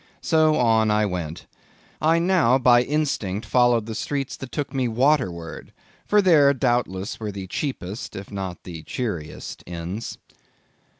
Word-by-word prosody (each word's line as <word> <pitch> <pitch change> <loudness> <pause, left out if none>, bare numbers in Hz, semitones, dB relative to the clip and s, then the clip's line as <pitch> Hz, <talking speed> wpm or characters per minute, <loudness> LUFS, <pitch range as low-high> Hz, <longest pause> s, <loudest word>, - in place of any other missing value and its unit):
So 155 -2 +3
on 115 -4 +3
I 105 0 +3
went. 85 -4 -4 0.6
I 160 +2 +4
now 170 -8 +3
by 125 -2 +5
instinct 125 -8 -1
followed 120 -1 +3
the 110 - -5
streets 135 +4 -3
that 135 - -8
took 145 -2 -3
me 130 -2 0
waterward, 110 - 0 0.3
for 210 -1 +4
there, 145 -6 +5
doubtless, 120 -7 -1
were 105 -2 -4
the 100 -1 -6
cheapest, 105 -2 -5
if 100 0 -8
not 95 -3 -5
the 85 -3 -8
cheeriest 85 -4 -5
inns. 90 +6 -5
115 Hz, 140 wpm, -23 LUFS, 95-140 Hz, 0.6 s, by